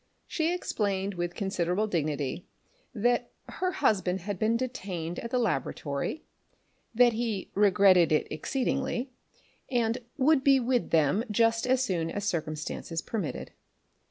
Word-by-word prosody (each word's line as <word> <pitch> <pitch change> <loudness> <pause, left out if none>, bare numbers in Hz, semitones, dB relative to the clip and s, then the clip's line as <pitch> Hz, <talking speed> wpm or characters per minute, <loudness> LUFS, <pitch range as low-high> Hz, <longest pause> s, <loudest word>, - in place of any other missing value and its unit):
She 325 0 0
explained 200 - -1
with 175 -1 -3
considerable 190 0 0
dignity 155 -5 -2 0.4
that 240 +1 +1 0.2
her 370 0 -2
husband 190 - +1
had 200 0 -4
been 225 +2 +2
detained 190 -10 -4
at 235 - -5
the 250 - 0
laboratory, 205 - -2 0.7
that 240 0 +5
he 220 -4 -3
regretted 195 -4 +5
it 155 - +2
exceedingly, 260 - -2 0.6
but 235 -2 0
would 280 0 +4
be 275 -1 +5
with 245 -1 0
them 160 +6 +3
just 230 +2 +2
as 260 0 +3
soon 170 -8 -1
as 205 +3 -4
circumstances 160 -1 -3
permitted. 205 -9 -4
210 Hz, 130 wpm, -28 LUFS, 175-245 Hz, 0.7 s, that